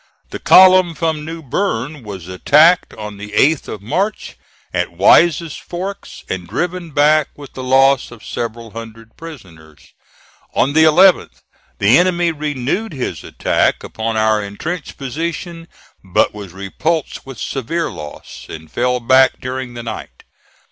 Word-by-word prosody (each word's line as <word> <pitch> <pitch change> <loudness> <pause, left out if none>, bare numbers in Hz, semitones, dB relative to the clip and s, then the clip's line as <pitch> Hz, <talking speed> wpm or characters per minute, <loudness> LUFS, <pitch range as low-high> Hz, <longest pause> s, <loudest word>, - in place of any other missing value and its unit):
The - - -6
column 185 -2 +6
from 160 -2 -1
New 165 +1 -7
Bern 145 - -2
was 100 -6 -9
attacked 150 - +4
on 105 -1 -8
the 105 0 -9
8th 150 +5 +2
of 105 - -7
March, 195 - -2 0.4
at - - -1
Wise's 165 -2 +4
Forks, 190 +3 -7
and 90 -2 -5
driven 175 - -3
back 150 0 +3
with 145 -1 -12
the 130 - -7
loss 135 +1 +3
of 115 -3 -14
several 115 -1 -5
hundred 115 0 -10
prisoners. 85 - -13 0.6
On 140 +3 +2
the 160 +1 +5
11th 180 +3 +4 0.3
the 105 +9 +5
enemy 175 -1 +2
renewed 150 - -3
his 130 -3 -4
attack - - 0
upon 110 0 -3
our 110 -1 +2
intrenched 150 - -6
position, 165 +4 -5 0.4
but 95 -2 +1
was 100 -3 -9
repulsed 130 - -3
with 135 -3 -9
severe 155 +6 -3
loss, 75 -1 -10
and 80 -1 -10
fell 125 +1 0
back 130 +2 +4
during 130 -1 -5
the 120 - -6
night. 110 - -8
135 Hz, 140 wpm, -17 LUFS, 110-165 Hz, 0.6 s, column